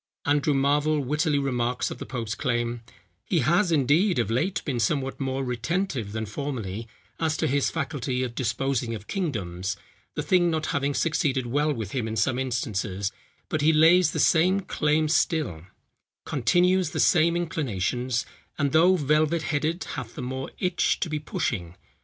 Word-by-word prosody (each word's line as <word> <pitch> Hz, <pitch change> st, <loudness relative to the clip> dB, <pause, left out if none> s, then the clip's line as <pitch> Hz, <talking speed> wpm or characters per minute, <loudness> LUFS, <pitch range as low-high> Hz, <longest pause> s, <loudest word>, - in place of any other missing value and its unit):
Andrew 145 Hz, 0 st, +2 dB
Marvel 145 Hz, +2 st, +2 dB
wittily 150 Hz, +3 st, +1 dB
remarks 125 Hz, -3 st, -1 dB
of -, -, -7 dB
the -, -, -7 dB
pope's 115 Hz, -4 st, -3 dB
claim, 120 Hz, -2 st, -1 dB, 0.4 s
"He 160 Hz, +6 st, +1 dB
has, 170 Hz, -, +2 dB
indeed, 155 Hz, +5 st, +3 dB
of 115 Hz, -3 st, 0 dB
late, 160 Hz, +12 st, 0 dB
been 130 Hz, -5 st, -1 dB
somewhat 135 Hz, +4 st, 0 dB
more 135 Hz, 0 st, -2 dB
retentive 125 Hz, -, -2 dB
than 110 Hz, +1 st, -3 dB
formerly 115 Hz, -3 st, -4 dB, 0.3 s
as 160 Hz, -1 st, 0 dB
to -, -, 0 dB
his 140 Hz, +1 st, +1 dB
faculty 135 Hz, -4 st, -2 dB
of 120 Hz, -2 st, -4 dB
disposing 120 Hz, 0 st, -1 dB
of 105 Hz, -1 st, -9 dB
kingdoms, 100 Hz, -, -3 dB, 0.4 s
the -, -, -2 dB
thing 175 Hz, -2 st, +3 dB
not 160 Hz, -1 st, -1 dB
having 140 Hz, 0 st, 0 dB
succeeded 145 Hz, -5 st, +1 dB
well 145 Hz, +5 st, +1 dB
with 110 Hz, -8 st, -4 dB
him 120 Hz, -4 st, -2 dB
in 110 Hz, -, -3 dB
some 120 Hz, +5 st, +1 dB
instances, 105 Hz, -6 st, -2 dB, 0.4 s
but 155 Hz, -, -1 dB
he 155 Hz, +2 st, +5 dB
lays 165 Hz, +3 st, +6 dB
the -, -, -3 dB
same 185 Hz, +4 st, +4 dB
claim 155 Hz, -3 st, +1 dB
still, 150 Hz, -, 0 dB, 0.6 s
continues 175 Hz, +7 st, +2 dB
the -, -, -4 dB
same 170 Hz, 0 st, +4 dB
inclinations, 125 Hz, -, -1 dB, 0.3 s
and 140 Hz, -2 st, +1 dB
though 175 Hz, +5 st, +5 dB
velvet 155 Hz, +1 st, +2 dB
headed 155 Hz, +3 st, -1 dB
hath 125 Hz, -5 st, -7 dB
the -, -, -5 dB
more 130 Hz, +1 st, -4 dB
itch 180 Hz, -2 st, +1 dB
to 170 Hz, -, -1 dB
be 155 Hz, -, -1 dB
pushing. 90 Hz, -, -3 dB
140 Hz, 165 wpm, -26 LUFS, 120-160 Hz, 0.6 s, lays